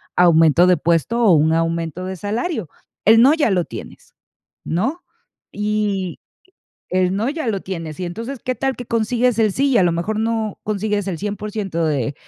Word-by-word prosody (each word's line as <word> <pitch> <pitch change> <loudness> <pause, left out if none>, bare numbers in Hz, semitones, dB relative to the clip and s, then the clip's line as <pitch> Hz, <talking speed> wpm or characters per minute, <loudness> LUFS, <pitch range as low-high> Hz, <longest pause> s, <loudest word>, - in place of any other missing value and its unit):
aumento 170 -1 +5
de 180 -1 +4
puesto 170 +8 +1
o 195 -6 +6
un 155 +1 +4
aumento 165 +1 -1
de 190 0 -4
salario? 215 - -3 0.4
El 225 +2 +7
"no" 275 +5 +6
ya 305 -8 +2
lo 180 -3 +1
tienes, - - -10 0.5
¿no? 260 - -2 0.5
Y 210 -3 -2 0.7
el 185 0 +1
"no" 220 +6 0
ya 305 -3 -4
lo 200 -3 -1
tienes, 165 -4 -6
y 180 - -2
entonces, 230 +10 -6
¿qué 255 - 0
tal 270 0 -1
que 245 - -7
consigues 230 +1 +1
el 215 -2 +3
"sí"? 275 +5 +1
Y 245 - +4
a 185 - +4
lo 175 - +3
mejor 190 +6 -2
no 225 -2 -2
consigues 210 -1 -1
el 180 - -3
100% 205 -3 -3
de 140 -3 -1
205 Hz, 180 wpm, -20 LUFS, 175-225 Hz, 0.7 s, El